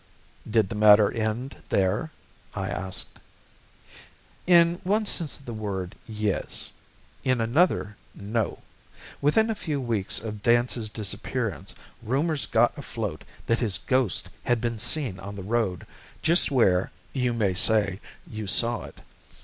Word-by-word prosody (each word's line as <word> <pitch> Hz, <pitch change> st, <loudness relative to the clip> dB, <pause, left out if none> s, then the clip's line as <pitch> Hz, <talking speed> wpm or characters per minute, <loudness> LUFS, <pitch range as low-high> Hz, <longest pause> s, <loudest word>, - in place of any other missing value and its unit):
"Did 110 Hz, -3 st, +2 dB
the -, -, -4 dB
matter 105 Hz, -1 st, +6 dB
end 115 Hz, +4 st, -3 dB
there?" 95 Hz, +11 st, +1 dB, 0.5 s
I -, -, -2 dB
asked. 95 Hz, 0 st, -6 dB, 1.3 s
"In 170 Hz, -1 st, +5 dB
one 210 Hz, +4 st, +1 dB
sense 170 Hz, -8 st, -2 dB
of 140 Hz, -, -18 dB
the 120 Hz, -, -6 dB
word, 100 Hz, -4 st, -4 dB
yes 105 Hz, -3 st, -2 dB, 0.5 s
in 130 Hz, -2 st, +2 dB
another, 115 Hz, -, +2 dB, 0.2 s
no. 110 Hz, +3 st, -2 dB, 0.6 s
Within 220 Hz, +11 st, +3 dB
a -, -, +1 dB
few 155 Hz, -9 st, -3 dB
weeks 115 Hz, -7 st, -1 dB
of 105 Hz, -2 st, -6 dB
Dance's 120 Hz, -1 st, +2 dB
disappearance 105 Hz, -2 st, -1 dB, 0.3 s
rumours 140 Hz, +6 st, 0 dB
got -, -, +3 dB
afloat -, -, -5 dB, 0.2 s
that 115 Hz, -, +1 dB
his 105 Hz, -7 st, +1 dB
ghost 125 Hz, +1 st, +1 dB
had 120 Hz, -1 st, +2 dB
been 115 Hz, -1 st, -2 dB
seen 125 Hz, -8 st, -1 dB
on 100 Hz, +1 st, -7 dB
the 100 Hz, -, -6 dB
road, 105 Hz, -5 st, -1 dB, 0.4 s
just 170 Hz, +2 st, +4 dB
where, 95 Hz, -9 st, +3 dB, 0.2 s
you 125 Hz, -3 st, +1 dB
may 105 Hz, -5 st, +1 dB
say, 105 Hz, -1 st, +2 dB, 0.3 s
you 110 Hz, -2 st, -6 dB
saw 115 Hz, +5 st, +2 dB
it. -, -, -13 dB
115 Hz, 135 wpm, -26 LUFS, 100-130 Hz, 1.3 s, matter